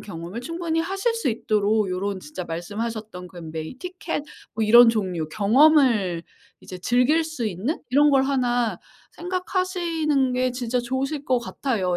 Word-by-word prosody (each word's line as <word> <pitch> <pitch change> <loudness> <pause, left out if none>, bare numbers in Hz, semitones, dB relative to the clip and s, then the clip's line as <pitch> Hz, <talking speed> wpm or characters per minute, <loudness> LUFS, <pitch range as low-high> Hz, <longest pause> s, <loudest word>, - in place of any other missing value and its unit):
경험을 180 +3 -7
충분히 330 +2 -2
하실 390 +7 -1
수 460 - -1
있도록 215 -2 +1
요런 190 +1 -2
진짜 175 +4 -7
말씀하셨던 205 +2 -5
그 180 - -17 0.2
메이 160 +9 -6
티켓 360 -3 -5 0.3
뭐 220 0 0
이런 235 +2 +8
종류 185 -8 -1
경험을 220 - +4 0.4
이제 185 - -9
즐길 250 - +2
수 315 -8 -4
있는 210 - -2
이런 290 +3 +5
걸 270 -1 +4
1 245 -7 0 0.3
생각하시는 345 -6 -1
게 255 0 +1
진짜 245 0 -1
좋으실 270 +4 -3
것 255 -1 +3
같아요. 220 -7 -2
245 Hz, 295 characters per minute, -24 LUFS, 200-300 Hz, 0.4 s, 이런